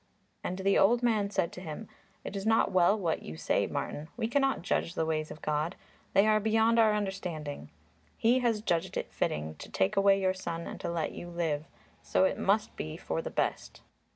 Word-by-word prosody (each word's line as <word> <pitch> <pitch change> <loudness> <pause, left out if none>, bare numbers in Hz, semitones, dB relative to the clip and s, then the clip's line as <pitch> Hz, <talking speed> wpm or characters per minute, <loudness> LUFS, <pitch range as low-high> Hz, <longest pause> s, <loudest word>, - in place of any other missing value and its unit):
And 185 - -3
the 195 +1 +3
old 235 +5 +4
man 215 -4 +2
said 175 -4 0
to 180 - -9
him, 175 +5 -7 0.4
"It - - -6
is 195 - -3
not 225 +1 +3
well 185 +3 +4
what 170 -6 -1
you 80 - -8
say, - - +1
Martin; 150 +2 -4
we 225 - 0
cannot 270 -3 +1
judge 175 -1 -1
the 160 - 0
ways 155 -1 -1
of 150 - -10
God; 155 +4 -1 0.4
they 195 - +5
are 215 0 +4
beyond 220 +2 +3
our 215 -2 +5
understanding. 180 -8 -4 0.5
He 240 +2 +4
has 230 -4 0
judged 175 -2 0
it - - -4
fitting 75 +1 -1
to - - -9
take 200 +3 +1
away 195 0 +5
your 185 -1 +2
son 170 -3 -5
and - - -7
to - - -2
let 170 -2 -1
you 175 - -8
live, 160 -3 -1 0.4
so - - +2
it 190 - +1
must 210 +2 +1
be 75 0 -5
for - - -3
the - - -5
best. - - -2
190 Hz, 210 wpm, -30 LUFS, 165-215 Hz, 0.5 s, they